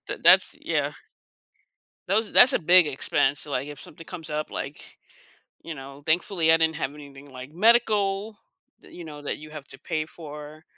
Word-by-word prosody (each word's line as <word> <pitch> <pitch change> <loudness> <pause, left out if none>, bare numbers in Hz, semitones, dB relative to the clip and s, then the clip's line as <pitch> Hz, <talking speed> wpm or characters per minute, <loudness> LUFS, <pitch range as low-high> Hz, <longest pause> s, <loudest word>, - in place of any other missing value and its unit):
That - - -6
that's, - - +5
yeah. - - -1 1.2
Those 215 +2 +1
ar - - -15
that's 255 +2 +8
a - - +2
big 175 +1 +5
expense, 140 0 0
like, 140 0 -3
if 145 - -9
something 165 +2 -13
comes 165 -4 -8
up, 150 0 -3
like, 140 +2 -8 0.6
you 165 - -7
know, 140 +1 -11
thankfully 165 0 +2
I 165 - +6
didn't 160 -1 +1
have 140 -3 -3
anything 140 -1 -13
like 130 +2 -10
medical 210 0 +2 0.4
that, - - -18
you 175 - -9
know 150 -2 -10
that 145 - -4
you 155 0 -12
have 150 -2 -9
to 135 - -12
pay 155 -3 -3
for. 150 -1 -11
155 Hz, 185 wpm, -25 LUFS, 145-180 Hz, 1.2 s, that's